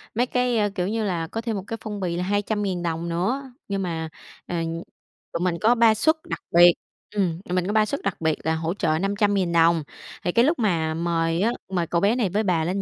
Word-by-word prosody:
mấy 245 +3 +2
cái, 250 -1 0
a, 205 -1 +2
kiểu 180 -3 -1
như 220 +2 -1
là, 175 -5 -1
có 225 +7 -4
thêm 230 -2 -2
một 195 - -4
cái 225 - -4
phong 210 -1 -5
bì 175 -3 -2
là 180 - -1
200.000 205 -2 -1
đồng 170 0 -2
nữa. 245 +11 -1 0.2
Nhưng 195 -1 -2
mà, 165 -3 -3 0.4
ờ, 175 - -3 0.8
tụi - - -1
mình 175 -2 0
có 230 +3 +5
3 230 -2 +5
suất 315 +9 +3
đặc - - -3
biệt, 175 0 +8 0.4
ừm, 180 -4 0
tụi 180 - -3
mình 180 0 0
có 205 - -1
3 215 -1 +4
suất 280 +6 -3
đặc 195 -4 -3
biệt 160 -1 +2
là 160 0 +2
hỗ 160 +1 -2
trợ 160 -5 0
500.000 200 -1 +1
đồng. 165 -1 +4 0.4
Thì 175 - 0
cái 235 +6 +4
lúc 315 0 +1
mà 165 -8 +1
mời 165 0 0
á, 225 +4 +3 0.2
mời 175 -2 0
cậu 170 0 0
bé 205 +4 +3
này 230 -6 +1
với 205 +4 0
bà 175 -5 +1
lên 185 +4 -1
185 Hz, 245 wpm, -24 LUFS, 170-215 Hz, 0.8 s, biệt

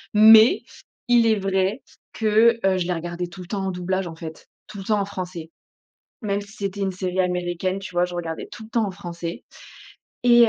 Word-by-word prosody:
Mais 220 +2 +8 0.4
il 240 -1 +5
est 220 - +4
vrai 195 +3 0 0.3
que, 225 +1 +4
heu, 190 -1 +3
je 175 - -1
les 180 - 0
regardais 175 +1 -4
tout 175 +2 -11
le 180 - -10
temps 195 -1 -2
en 190 - -1
doublage, 185 +1 -2
en 165 - -8
fait, 160 -1 -9 0.2
tout 215 -1 -9
le - - -6
temps 210 0 +2
en - - -1
français. 180 -4 -6 0.7
Même 200 -1 -1
si 200 0 -12
c'était 200 0 -4
une 195 -1 0
série 185 0 -2
américaine, 180 +1 -1
tu 195 - -9
vois? 175 0 +3
Je 180 0 -6
regardais 165 -2 -5
tout 220 - -9
le 220 - -14
temps 230 -1 +1
en - - -4
français, 175 -3 -7 0.8
et 240 -1 +7
190 Hz, 210 wpm, -23 LUFS, 175-210 Hz, 0.8 s, Mais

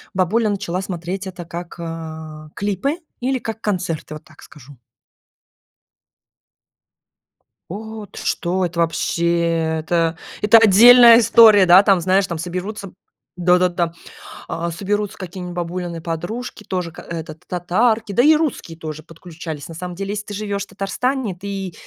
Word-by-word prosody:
бабуля 210 +4 +1
начала 190 -3 -2
смотреть 185 +1 -5
это 180 -2 -8
как, 170 +1 -8
э, 160 -2 -7
клипы, 205 - -2 0.2
или 260 +1 0
как 225 -1 -6
концерты. 180 -7 -3
Вот 155 - -11
так 155 - -19
скажу. 145 -1 -15 2.9
О, 220 +3 -7
ты - - -12
что 185 +2 -1
это 170 0 -5
вообще! 170 -1 0
Это 165 +1 0 0.2
это 210 +2 +7
отдельная 230 +3 +8
история. 220 -3 +7
Да, 180 +2 +8
там, 195 -3 +4
знаешь, 190 +2 +2
там 170 - -4
соберутся 185 +4 -5 0.5
да 180 0 +4
да, 180 - +4
там, 175 -1 -1 0.6
а, 170 +1 -3
соберутся 205 +4 -3
какие-нибудь 180 -1 -7
бабулины 175 -1 -4
подружки 175 +9 -5
тоже 180 -4 -4
к 160 - -13
этот 160 -1 -8
татарки, 215 +5 0
да 240 - +3
и 305 +4 +6
русские 290 - -3
тоже 155 -1 -7
подключались. 165 -2 -9
На 165 - -9
самом 180 +2 -7
деле, 195 +2 -4
если 210 0 -4
ты 205 - -8
живёшь 200 -1 -3
в - - -37
Татарстане, 210 +4 -2
ты, 195 -1 -6
180 Hz, 145 wpm, -20 LUFS, 170-205 Hz, 2.9 s, отдельная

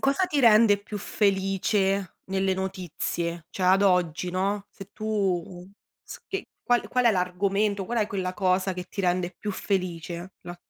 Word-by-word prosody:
cosa 275 +7 +2
ti 290 -4 0
rende 215 -3 +6
più 205 0 -7
felice 195 -1 0
nelle 190 0 0
notizie? 175 -3 -3
Cioè, 185 - -5
ad 190 +2 +5
oggi, 180 -2 +2
no, 195 +2 -1
se 195 0 -11
tu 190 -5 -2 0.4
s - - -10
che 390 0 -4 0.2
qual 245 -1 +1
qual 250 -1 +1
è - - +7
l'argomento, 195 +2 0
qual 235 +4 -2
è 210 - +2
quella 185 -3 -3
cosa 185 -1 +1
che 180 0 -5
ti - - -4
rende 180 -1 0
più 210 -1 -3
felice, 180 -2 -3
la 175 0 -8
190 Hz, 165 wpm, -26 LUFS, 180-205 Hz, 0.4 s, è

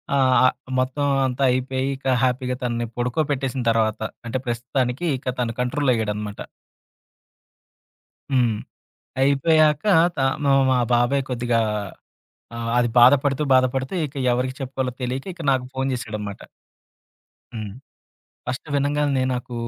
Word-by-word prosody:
ఆహ్, 130 -2 +4
ఆ! - - +7 0.3
మొత్తం 130 +3 0 0.2
అంతా 130 +1 -1
అయిపోయి 130 +1 -1
ఇక 135 - -17 0.2
హ్యాపీగా 125 0 0
తనని 120 -1 -1
పడుకోబెట్టేసిన 135 +1 -1
తర్వాత. 110 -1 +1 0.3
అంటే 115 +3 -2
ప్రస్తుతానికి 125 +5 -2
ఇక 130 0 -4
తను 115 -1 -1
కంట్రోలయ్యాడనమాట. 110 -6 -1 1.9
హ్మ్. 120 -4 +2 0.7
అయిపోయాక 150 +3 +3 0.3
త - - -35 0.3
మా 140 - +3 0.2
మా 130 - +3 0.2
బాబాయ్ 120 +3 +2
కొద్దిగా, 120 -2 0 1.0
ఆహ్, 115 0 -3
అది 120 -1 +2
బాధపడుతూ, 135 +2 +5
బాధపడుతూ 130 +4 +1
ఇక 140 - -14 0.2
ఎవరికి 130 +1 -1
చెప్పుకోవాలో 130 -1 -3
తెలియక 130 +4 -3
ఇక 170 - -9
నాకు 130 -1 0
ఫోను 135 0 -1
చేశాడనమాట. 105 -4 -5 1.1
హ్మ్. 110 -3 -5 0.8
ఫస్ట్ 130 +4 -5
వినంగాలనే 145 -1 +1
నాకు 125 0 -6
130 Hz, 115 wpm, -22 LUFS, 120-135 Hz, 1.9 s, ఆ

